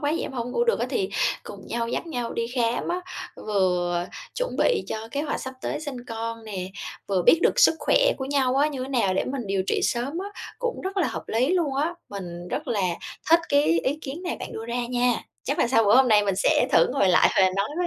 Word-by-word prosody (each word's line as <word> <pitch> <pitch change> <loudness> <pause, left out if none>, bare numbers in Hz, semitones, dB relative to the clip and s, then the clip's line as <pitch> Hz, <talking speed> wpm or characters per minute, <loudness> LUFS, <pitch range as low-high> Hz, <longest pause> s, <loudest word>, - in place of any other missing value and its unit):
vậy? 300 +3 0
Em - - -5
hổng 245 -1 -3
ngủ 475 - +1
được 475 - +2
á!", - - 0
thì 395 -4 -1 0.3
cùng - - -10
nhau 230 0 -2
dắt 335 - -3
nhau 245 -7 -3
đi 230 0 -1
khám 235 -1 0
á, 355 +1 -1 0.5
vừa 180 -3 +1 0.3
chuẩn - - -2
bị 480 - +2
cho 220 +1 -5
kế 285 - -2
hoạch 300 - -2
sắp 260 0 -6
tới - - -2
sinh 265 -5 -6
con 230 0 -5
nè, 190 -4 -4 0.4
vừa 190 -3 +1
biết 325 - +6
được - - +3
sức - - +7
khỏe - - +3
của 265 - -3
nhau 270 -2 +1
á, 295 +2 +4
như 270 -4 -4
thế 265 - -5
nào 230 -8 +1
để - - +1
mình 255 -5 -4
điều 195 -1 0
trị - - +1
sớm 265 +7 -1
á, 395 +2 -4 0.3
cũng 485 -1 -2
rất 385 +1 -5
là 360 - +2
hợp - - -5
lý 245 +5 +1
luôn 335 -7 +1
á. 320 +5 0
Mình 175 -3 -7
rất 300 -1 -4
là 215 -4 0 0.5
thích 335 +1 +7
cái 285 0 +4 0.2
ý 290 +3 0
kiến 300 +3 -6
này 355 - -3
bạn - - -6
đưa 225 +1 -6
ra 240 0 -2
nha, 245 0 +2 0.3
chắc 280 - -2
là - - +3
sau 225 -3 +4
bữa 205 +4 +6
hôm 265 -1 +6
nay 210 -2 +5
mình 195 -2 0
sẽ 220 +5 +3
thử - - +6
ngồi 200 -8 +3
lại 180 - +5
và - - +6
nói 200 +1 +1
với 355 - +1
250 Hz, 250 wpm, -25 LUFS, 215-300 Hz, 0.5 s, sức